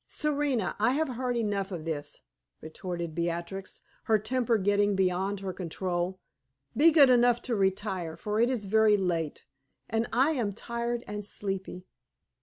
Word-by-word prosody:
"Serena, 285 -8 0
I 225 +4 +3
have 310 +1 0
heard 250 0 -2
enough 205 -3 -1
of 165 -4 -5
this," 155 -3 -4 0.4
retorted 170 0 -5
Beatrix, 170 +3 -4 0.2
her 220 - +4
temper 235 +2 +1
getting 205 0 +2
beyond 190 +1 0
her 190 -1 -4
control. 180 +1 -3 0.6
"Be 300 +7 +7
good 290 -5 +7
enough 245 -1 +4
to 245 - -1
retire; 190 -4 -1
for 210 +1 -2
it 235 +2 +4
is 240 -6 -2
very 215 +1 +4
late, 170 -5 -2 0.4
and 225 +1 0
I 265 +7 +3
am 235 -9 -1
tired 235 +2 -3
and 210 0 -5
sleepy." 195 -2 -4
205 Hz, 150 wpm, -29 LUFS, 185-235 Hz, 0.6 s, Be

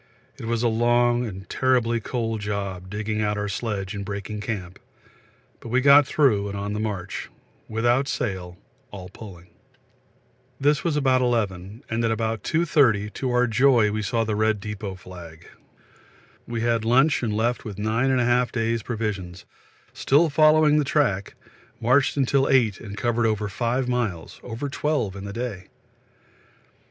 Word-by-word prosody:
It - - -6
was 115 0 -1
a - - +4
long 120 +1 +2
and 95 -2 -8
terribly 125 -3 +1
cold 115 -1 -3
job 100 -3 -4
digging 105 +2 -3
out 105 0 0
our 105 0 -2
sledge 100 -1 -3
and 100 -1 -5
breaking 100 +1 -5
camp, 95 -5 -5 0.8
but 115 - -10
we 125 +3 +2
got 140 +1 +6
through 110 -11 +2
and 100 - -5
on 100 +1 -3
the 105 - -3
march 100 -3 -4 0.4
without 120 +5 +1
sail, 95 -10 -3 0.3
all 95 -3 -9
pulling. 90 -3 -12 1.1
This 145 +1 +2
was 165 -3 0
about 130 -3 +3
11, 105 -2 -2
and 115 +1 -2
at 115 - +2
about 115 -1 -1
2.30, 125 -11 +2
to 130 - -3
our 125 0 +3
joy, 120 -2 +3
we 110 +1 -2
saw 115 +3 0
the 110 -1 -2
red 110 0 +1
depôt 100 -2 -6
flag. 85 -3 -12 1.0
We 115 -1 -3
had 115 -1 +1
lunch 130 +6 +3
and 115 -3 -1
left 115 +3 0
with 105 -4 -7
9 110 +5 0
1/2 125 -1 +2
days' 115 0 -1
provisions, 105 -6 -4 0.5
still 155 +3 +3
following 155 0 +5
the - - +2
track 130 -9 0 0.4
marched 130 +5 +2
till 135 +1 +2
8 115 -7 +3
and 100 0 -9
covered 120 +1 +1
over 105 -1 -1
5 120 +5 -1
miles, 115 -10 -3
over 120 +4 -5
12 140 -8 -1
in 100 0 -7
the 100 - -6
day. 115 -6 -5
115 Hz, 160 wpm, -24 LUFS, 100-125 Hz, 1.1 s, got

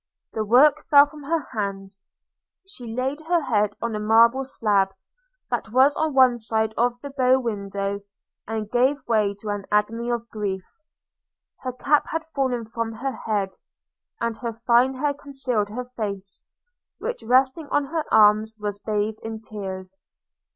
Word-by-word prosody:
The 220 - -1
work 275 +8 +4
fell 285 -1 +8
from 295 +1 -13
her 325 +1 -1
hands 195 -3 -5 0.3
– - - -64
she 245 - -8
laid 265 +4 -2
her 350 0 +3
head 210 -6 +1
on 235 -2 -2
a - - -2
marble 230 +5 +4
slab, 205 -6 +1 0.6
that 220 - -2
was 265 +4 +5
on 315 -3 -1
one 255 -2 +5
side 220 -1 -1
of 240 +1 +1
the 285 - -6
bow 260 -1 +3
window, 200 -3 -3 0.5
and 220 -1 -3
gave 260 +3 +1
way 210 -3 +2
to 210 +1 -8
an 205 -1 -3
agony 225 +3 +1
of 235 -1 -2
grief. 195 -3 -3 0.5
– - - -58
Her 255 - -2
cap 290 +4 +2
had 325 0 -3
fallen 265 -7 -2
from 225 0 -4
her 260 +5 -3
head, 205 -3 -2 0.7
and 230 -1 -1
her 235 -1 -4
fine 240 +3 +3
hair 285 +2 0
concealed 270 -7 -2
her 250 +4 -5
face, 200 -3 -5 0.5
which 485 - -4
resting 260 +6 +2
on 290 - +1
her 315 +3 -2
arms 215 +1 +5
was 205 -1 -4
bathed 215 0 -2
in 225 0 -6
tears. 195 -3 -7
230 Hz, 165 wpm, -24 LUFS, 210-265 Hz, 0.7 s, fell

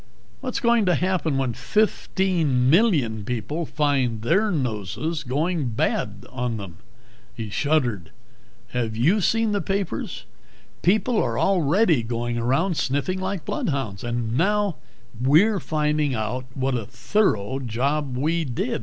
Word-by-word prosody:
What's 255 -2 -3
going 235 -4 +3
to 180 - +4
happen 175 -4 0
when 130 -3 0
fifteen 170 - +1
million 150 - +3
people 125 +9 -3
find 135 -7 0
their 195 - +3
noses 135 - -2
going 150 +1 -1
bad 100 -2 -1
on 125 -3 -2
them?" 95 -5 -8 0.6
He 110 -3 -5
shuddered. 120 - 0 0.6
"Have 115 -3 -2
you 170 - +3
seen 225 +3 +2
the 205 -1 0
papers? 195 - -3 0.6
People 215 +5 +2
are - - -1
already 175 - +3
going 120 +1 -2
around 140 +9 +1
sniffing 145 +8 0
like 190 -3 -3
bloodhounds. 130 -10 -2
And 120 -1 -2
now 205 +3 +1 0.4
we're 175 +11 +4
finding 150 -3 0
out 115 +4 -3
what 135 0 0
a 115 -5 -2
thorough 125 - 0
job 135 +3 -1
we 165 +5 +1
did. 125 -2 -2
145 Hz, 130 wpm, -24 LUFS, 120-185 Hz, 0.6 s, to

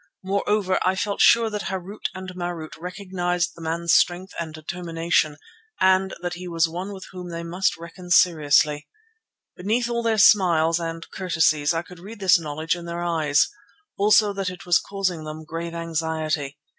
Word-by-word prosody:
Moreover, 200 0 0
I 185 +1 +2
felt 200 +1 -1
sure 230 -1 +5
that 210 -1 -4
Harût 190 +2 -6
and 185 0 -7
Marût 175 -3 -5
recognized 180 -1 -2
the 170 - -14
man's 165 +1 0
strength 180 +2 +2
and 165 -2 -4
determination 165 -1 -1 0.4
and 190 0 +3
that 175 0 -2
he 180 +1 -7
was 165 -1 +2
one 180 +5 -5
with 190 -1 -8
whom 180 -1 -8
they 170 0 -5
must 175 +2 0
reckon 170 +2 -11
seriously. 150 -4 +3 0.7
Beneath 225 +6 0
all 235 0 0
their 225 -1 +1
smiles 170 -5 +5
and 165 0 -5
courtesies 160 -5 +1
I 165 0 -1
could 180 0 -14
read 205 +5 -10
this 190 -2 +5
knowledge 155 +2 -2
in 175 -1 -8
their 170 0 -4
eyes; 155 -4 +2 0.5
also 210 0 +4
that 195 -2 -2
it 180 -1 -10
was 175 -2 +4
causing 185 -5 -3
them 155 +1 -7
grave 165 +2 -5
anxiety. 160 -3 -2
175 Hz, 170 wpm, -23 LUFS, 165-190 Hz, 0.7 s, sure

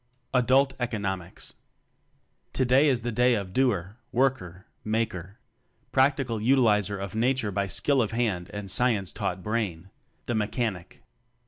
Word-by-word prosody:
Adult 130 +2 +4
Economics. 100 -7 -4 1.0
Today 130 +3 +4
is 130 -4 +2
the 120 +1 -2
day 125 +2 +3
of 100 -3 -4
Doer, 105 -6 0
Work 130 0 +2
er, 90 +1 -11 0.2
Maker 110 -3 -2 0.5
practical 130 -4 +2
utilizer 105 -5 +3
of 95 0 -6
Nature 120 -1 +1
by 100 +1 -1
skill 140 +6 +2
of 110 - 0
hand 110 -7 -1
and 105 -2 -5
science 110 -6 +1
taught 90 0 -3
brain 100 -5 -3 0.3
the 120 - -2
Mechanic. 105 -4 -3
110 Hz, 130 wpm, -27 LUFS, 100-125 Hz, 1.0 s, Adult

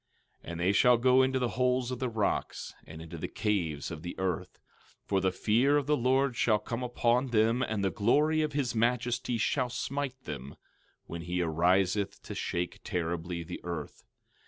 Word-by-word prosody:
12:19 - - -7
And 85 - -5
they 90 +3 +3
shall 120 +4 +5
go 130 +2 +5
into 130 0 +2
the 125 -2 0
holes 125 +1 +1
of 125 - -4
the 130 - -1
rocks, 110 -3 -2
and 80 +1 -9
into 80 - -8
the - - -3
caves 85 -10 -1
of 80 -2 -6
the 85 +1 -6
earth, 95 -4 -2 0.5
for 95 -1 +1
the 95 0 +2
fear 120 +9 +3
of 145 - 0
the 150 +1 +3
Lord 130 0 +2
shall 110 -1 +3
come 115 +3 -5
upon 125 +1 +1
them 115 +1 +2
and 110 -5 -1
the 95 - +1
glory 150 - +3
of 155 -1 -1
his 140 -4 0
majesty 120 +1 0
shall 125 +3 +1
smite 130 +1 -3
them, 70 - -7 0.5
when 85 0 -6
he 90 +1 -2
ariseth 90 +4 +1
to - - -7
shake 90 0 -3
terribly 85 -2 -3
the 90 +2 -7
earth. 85 -4 -6
115 Hz, 185 wpm, -30 LUFS, 90-125 Hz, 0.5 s, shall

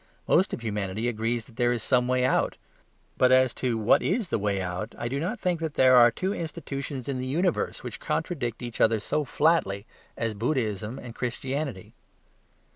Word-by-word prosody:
Most 185 - +3
of - - -4
humanity 105 0 -2
agrees 115 0 -1
that 120 - -19
there 120 0 +3
is 120 -3 -2
some 125 -2 +2
way 125 0 +2
out. - - +1 0.6
But 130 0 +5
as 130 -1 +5
to 125 -3 +1
what 110 0 +4
is 200 0 0
the - - 0
way 100 -1 0
out, 95 +4 -4
I 120 - -3
do 135 +4 -2
not 185 +10 -2
think 180 -2 0
that 160 -2 -3
there 130 -1 +6
are 120 -1 +8
two 185 - -2
institutions 145 - -5
in 135 -2 -2
the 130 - -3
universe 175 +7 0
which - - -6
contradict 135 - -2
each 120 -2 -5
other 110 -1 +4
so 150 +8 -1
flatly 125 -10 +1 0.3
as 115 -2 -1
Buddhism 110 -1 -2
and 120 -2 -8
Christianity. 130 -2 -4
125 Hz, 190 wpm, -27 LUFS, 110-145 Hz, 0.6 s, are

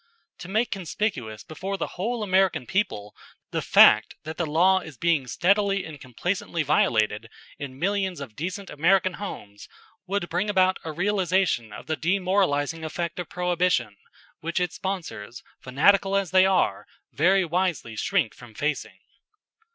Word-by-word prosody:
To 175 - -8
make 220 +4 0
conspicuous 165 - -3
before 190 +5 -5
the - - -3
whole 225 +5 -2
American 185 -7 +2
people 105 - -2 0.4
the - - -1
fact - - +6
that 160 +1 -7
the 170 - -1
law 180 +5 +4
is 160 -7 -11
being 165 -5 +1
steadily 195 - +1
and 155 -3 -10
complacently 165 - -2
violated 110 -6 +1 0.3
in 135 -2 -7
millions 190 +1 -1
of 130 -7 -8
decent 185 +5 -5
American 185 +4 +2
homes 105 - -8 0.4
would 195 -2 -1
bring 180 +5 -1
about 185 -2 +3
a 160 - -4
realization 185 - 0
of - - -9
the 160 - -1
demoralizing 170 -2 0
effect 170 +2 -4
of 175 - -5
Prohibition 180 - 0 0.4
which 170 +2 -2
its 180 -2 -1
sponsors, 140 - -5 0.2
fanatical 195 +9 +3
as 195 -4 0
they 185 0 +6
are, 180 - +1 0.3
very 185 +5 +3
wisely 170 -9 -1
shrink 165 - 0
from 120 -3 -15
facing. 150 +1 -2
175 Hz, 145 wpm, -25 LUFS, 145-190 Hz, 0.4 s, fact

